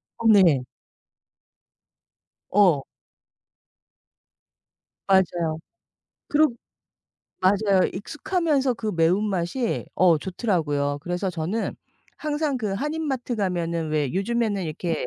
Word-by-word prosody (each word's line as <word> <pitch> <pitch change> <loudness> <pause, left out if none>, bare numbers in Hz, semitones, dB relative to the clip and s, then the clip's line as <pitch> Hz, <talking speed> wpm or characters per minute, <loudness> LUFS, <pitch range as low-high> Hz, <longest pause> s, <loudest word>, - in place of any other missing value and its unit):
어 230 - -1
네. 175 - +5 1.9
어. 180 -9 +4 2.2
맞아요. 175 -4 +2 0.7
그러 305 +1 +4 0.9
맞아요. 195 0 +3
익숙하면서 290 - 0
그 220 -1 -3
매운맛이 190 +6 0
어 175 -4 +4
좋더라고요. 150 -7 -1
그래서 180 +2 -2
저는 175 +7 -3 0.4
항상 300 -2 -1
그 215 -5 -2
한인 300 +8 -2
마트 250 -3 -2
가면은 170 -5 -1
왜 150 -4 0
요즘에는 205 0 0
이렇게 165 +1 -3
195 Hz, 200 characters per minute, -24 LUFS, 170-235 Hz, 2.2 s, 네